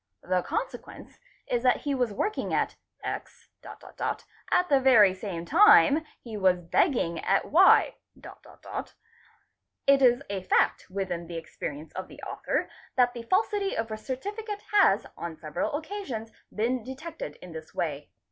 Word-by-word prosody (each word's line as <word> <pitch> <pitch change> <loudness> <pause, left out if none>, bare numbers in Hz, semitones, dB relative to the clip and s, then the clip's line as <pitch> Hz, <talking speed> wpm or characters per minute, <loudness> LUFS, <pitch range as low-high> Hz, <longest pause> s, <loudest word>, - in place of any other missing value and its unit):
The 180 0 +1
consequence 455 - -6 0.3
is 240 - -1
that 250 0 +3
he 285 - -1
was 250 -4 0
working 415 - -2
at - - 0 0.3
X.... - - -6
at 360 - -3
the 280 -4 +4
very 230 -8 +6
same 185 -3 -6
time 335 - +6 0.2
he 230 -3 -9
was 185 -2 +3
begging 170 - +1
at 195 - +1
Y.... 370 +6 +6 1.9
It 275 0 +5
is 250 +1 +4
a 200 -2 -3
fact 185 - +1
within 180 -3 -3
hs 170 0 -6
experience 155 -1 -7
of 185 - -6
the - - -14
author - - -2 0.3
that 245 -1 +3
the 240 - -6
falsity 395 - 0
of 225 0 -2
a - - -2
Noni 265 - -5
cate 415 -1 -6
has 395 - +4
on 170 -2 -6
several 155 - -3
occasions 300 - -5 0.2
been 240 +4 0
detected 265 - -7
in 180 - -12
this 160 -1 -10
way. 145 -3 -3
235 Hz, 145 wpm, -27 LUFS, 185-310 Hz, 1.9 s, very